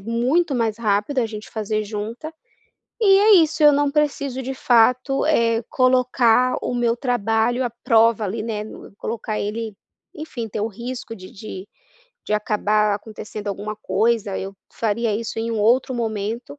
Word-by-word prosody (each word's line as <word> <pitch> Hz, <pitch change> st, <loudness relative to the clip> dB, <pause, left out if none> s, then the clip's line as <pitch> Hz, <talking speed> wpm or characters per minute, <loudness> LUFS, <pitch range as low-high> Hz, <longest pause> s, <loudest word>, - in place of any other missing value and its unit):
muito 250 Hz, -, 0 dB
mais 225 Hz, -3 st, -1 dB
rápido 215 Hz, +5 st, 0 dB
a 240 Hz, -, +2 dB
gente 215 Hz, -1 st, -8 dB
fazer 215 Hz, -1 st, -2 dB
junta, 225 Hz, +9 st, -6 dB, 0.7 s
e 390 Hz, -3 st, +6 dB
é 420 Hz, +1 st, +6 dB
isso, 315 Hz, -2 st, +2 dB
eu 295 Hz, -1 st, +8 dB
não 285 Hz, 0 st, +2 dB
preciso 280 Hz, -3 st, -1 dB
de 265 Hz, +1 st, -4 dB
fato, 255 Hz, +3 st, +3 dB
eh, 230 Hz, -6 st, +2 dB
colocar 255 Hz, -1 st, +3 dB
o 245 Hz, -, -2 dB
meu 240 Hz, -1 st, +1 dB
trabalho 240 Hz, 0 st, 0 dB
à 240 Hz, -, -2 dB
prova 225 Hz, -1 st, +4 dB
ali 215 Hz, +3 st, -3 dB
né 215 Hz, -2 st, -3 dB
nu 215 Hz, -, -12 dB
colocar 220 Hz, -1 st, -4 dB
ele, 215 Hz, 0 st, -4 dB, 0.4 s
enfim, 285 Hz, -, -6 dB
ter 210 Hz, -, -4 dB
o 215 Hz, -, -1 dB
risco 235 Hz, +1 st, -7 dB
de 185 Hz, -2 st, -12 dB
de 195 Hz, -2 st, -9 dB, 0.5 s
de 210 Hz, -, -1 dB
acabar 210 Hz, 0 st, +1 dB
acontecendo 215 Hz, 0 st, -8 dB
alguma 205 Hz, +2 st, -4 dB
coisa, 210 Hz, 0 st, 0 dB
eu 195 Hz, +1 st, -6 dB, 0.2 s
faria 225 Hz, 0 st, -1 dB
isso 225 Hz, 0 st, -5 dB
em 225 Hz, +1 st, -2 dB
um 225 Hz, -, -2 dB
outro 250 Hz, +5 st, +2 dB
momento, 225 Hz, +4 st, -4 dB
230 Hz, 165 wpm, -21 LUFS, 215-255 Hz, 0.7 s, eu